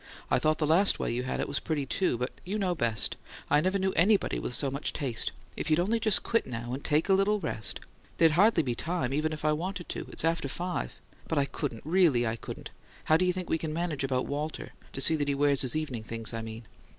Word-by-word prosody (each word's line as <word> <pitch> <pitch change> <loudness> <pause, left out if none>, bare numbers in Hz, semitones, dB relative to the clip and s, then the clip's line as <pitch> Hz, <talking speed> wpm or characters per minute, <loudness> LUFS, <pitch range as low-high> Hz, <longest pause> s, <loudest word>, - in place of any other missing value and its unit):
"I - - +4
thought 155 0 +2
the 155 - 0
last 170 +6 +4
way - - -2
you 120 - -1
had 130 - -3
it - - -1
was 140 - -1
pretty, 150 -4 -2
too. 160 -1 0
But 125 +2 -2
you 200 +4 -3
know 190 -4 0
best; 115 -9 0 0.3
I 145 +1 +5
never 185 +4 +1
knew 190 0 0
anybody 200 +4 +3
with 125 - -2
so 140 -2 +1
much 140 +2 -3
taste. 125 -6 -1 0.2
If - - -3
you'd 155 +1 +3
only 215 +6 +1
just 215 -3 +4
quit 230 - 0
now, 120 +1 -5
and 135 - -5
take 155 +2 +2
a 195 - +4
little 200 +2 +3
rest 115 - -3 0.2
" - - -30
"There'd 165 -1 +5
hardly 185 +1 +4
be 125 -3 -1
time, 155 -1 -2
even 155 +2 0
if 155 0 -5
I 155 - +4
wanted 175 +3 -3
to; - - -4
it's - - -1
after 165 -3 0
five 175 +6 -4 0.3
but 160 - -1
I 140 - +3
couldn't; 140 -5 -5
really, 160 -8 +3
I 110 0 -1
couldn't. - - -8 0.3
How 155 - +3
do 185 - +1
you 180 - +3
think 180 -1 -5
we 160 - 0
can 155 -1 -4
manage 160 -4 -2
about 130 -1 0
Walter 150 +2 -4 0.2
to 135 - -3
see 160 +4 +7
that 145 -1 -1
he 140 - +1
wears 140 -1 +3
his 130 0 +3
evening 150 -7 -3
things, 115 +1 -5
I 115 - -3
mean?" 110 +1 -8
155 Hz, 255 wpm, -29 LUFS, 130-180 Hz, 0.3 s, see